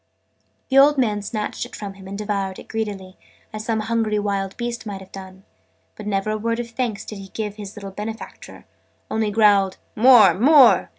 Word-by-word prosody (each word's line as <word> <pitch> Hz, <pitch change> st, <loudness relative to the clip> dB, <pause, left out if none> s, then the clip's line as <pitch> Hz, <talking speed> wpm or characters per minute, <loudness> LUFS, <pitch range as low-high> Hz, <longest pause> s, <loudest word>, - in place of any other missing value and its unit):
The 270 Hz, 0 st, +5 dB
old 290 Hz, +1 st, +6 dB
man 215 Hz, -5 st, +1 dB
snatched 210 Hz, +1 st, -4 dB
it -, -, -9 dB
from 200 Hz, -2 st, -7 dB
him, 195 Hz, -1 st, -13 dB
and 200 Hz, +1 st, -6 dB
devoured 200 Hz, -2 st, -3 dB
it -, -, -12 dB
greedily, 205 Hz, -4 st, -5 dB, 0.4 s
as 215 Hz, 0 st, -6 dB
some 225 Hz, -1 st, 0 dB
hungry 225 Hz, -1 st, 0 dB
wild 200 Hz, -2 st, -2 dB
beast 240 Hz, 0 st, -4 dB
might 200 Hz, -2 st, -5 dB
have 190 Hz, -, -14 dB
done, 190 Hz, 0 st, -11 dB, 0.5 s
but 210 Hz, -, -9 dB
never 200 Hz, +1 st, -1 dB
a 215 Hz, -, -2 dB
word 230 Hz, +2 st, -1 dB
of 235 Hz, -1 st, -5 dB
thanks 230 Hz, -4 st, -3 dB
did 210 Hz, -, -8 dB
he 195 Hz, -, -9 dB
give 210 Hz, +1 st, -5 dB
his 205 Hz, -1 st, -8 dB
little 200 Hz, -2 st, -8 dB
benefactor 220 Hz, +3 st, -8 dB, 0.5 s
only 220 Hz, -1 st, 0 dB
growled 205 Hz, -3 st, +3 dB, 0.2 s
"More, 225 Hz, -5 st, +7 dB
more!" 265 Hz, -, +5 dB
210 Hz, 190 wpm, -22 LUFS, 195-225 Hz, 0.5 s, More